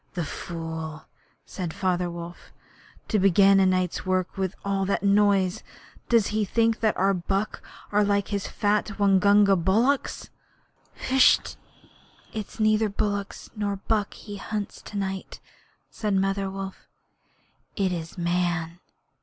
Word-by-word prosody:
'The 175 -3 -2
fool!' 160 -1 -6 0.4
said 180 -4 -5
Father 180 -2 0
Wolf. 170 0 -9 0.6
'To 215 - +1
begin 195 +1 +5
a 190 - +4
night's 185 -2 0
work 185 -1 -1
with 190 0 -2
that 195 0 0
noise. 200 -2 +3 0.5
Does 230 -4 +4
he 215 0 +1
think 225 +2 +1
that 220 -2 +1
our 195 +1 +3
buck 195 +3 -2 0.3
are 210 0 +3
like 200 -1 +1
his 200 -2 -2
fat 205 0 0
Waingunga 200 0 +5
bullocks?' 220 +11 +1 0.8
'H'sh. 260 0 +4 0.8
It 215 -2 -4
is - - -16
neither 215 0 +3
bullock 200 0 -2 0.2
nor 205 -2 -1
buck 205 +1 -1
he 205 -1 -9
hunts 210 0 -5
to 205 - -8
night,' 190 -1 -4 0.5
said 210 -2 -1
Mother 195 0 0
Wolf. 195 0 -7 0.9
'It 195 -3 0
is 165 -1 -5
Man.' 175 -1 -1
195 Hz, 130 wpm, -25 LUFS, 185-205 Hz, 0.9 s, begin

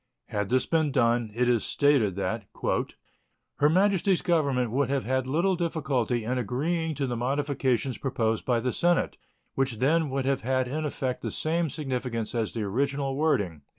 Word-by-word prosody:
Had 105 -1 -2
this 130 +1 +2
been 160 -3 +1
done, 120 -3 +2
it 125 +1 +2
is 120 -3 +2
stated 140 -10 +2
that 100 +3 -2 1.1
"Her 145 - +4
Majesty's 190 +1 +2
Government 140 -8 +1
would 140 +3 +1
have 140 -1 0
had 130 +1 -1
little 170 +8 +2
difficulty 140 -9 -1
in 125 +3 -1
agreeing 155 - -1
to 140 - -1
the 125 -2 -2
modification 135 0 0
proposed 115 -4 -1
by 120 -2 +1
the 125 +1 -1
Senate, 175 0 +1 0.4
which 135 -4 -1
then 150 +5 +2
would 135 0 -2
have 135 0 +1
had 130 0 0
in 155 +4 -3
effect 130 -3 -3
the - - -3
same 165 +1 0
signification 125 -5 -3
as 110 - -2
the 110 - -1
original 135 +6 -1
wording." 100 - 0
130 Hz, 170 wpm, -27 LUFS, 120-150 Hz, 1.1 s, Her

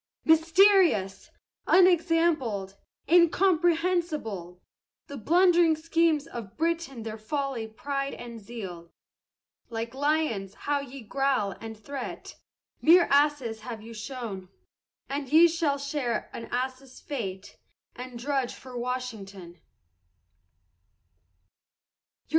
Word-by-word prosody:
Mysterious! 325 - +4 0.4
unexampled! 330 - +3 0.3
incomprehensible! 335 - +2 0.5
The 280 - -8
blundering 340 - +4
schemes 325 -1 +1
of 230 -9 -9
Britain 325 -7 -2
their 220 0 -6
folly, 270 -1 -3
pride, 275 +5 -4
and 235 -1 -9
zeal, 195 -6 -8 0.8
Like 230 0 -4
lions 275 -9 -1
how 290 0 -1
ye 275 -1 -8
growl 260 -3 0
and 225 -1 -7
threat! 270 +3 -7 0.5
mere 340 +2 +6
asses 280 -6 +2
have 220 -1 -8
you 230 +1 -10
shown, 215 -5 -6 0.6
And 275 -1 -4
ye 325 +3 +8
shall 320 -4 0
share 280 -5 -3
an 230 - -6
ass's 255 +1 -4
fate, 195 -9 -6 0.4
and 250 0 -8
drudge 265 0 -2
for 255 -1 -12
Washington! 210 -9 -6
270 Hz, 95 wpm, -27 LUFS, 225-320 Hz, 0.8 s, ye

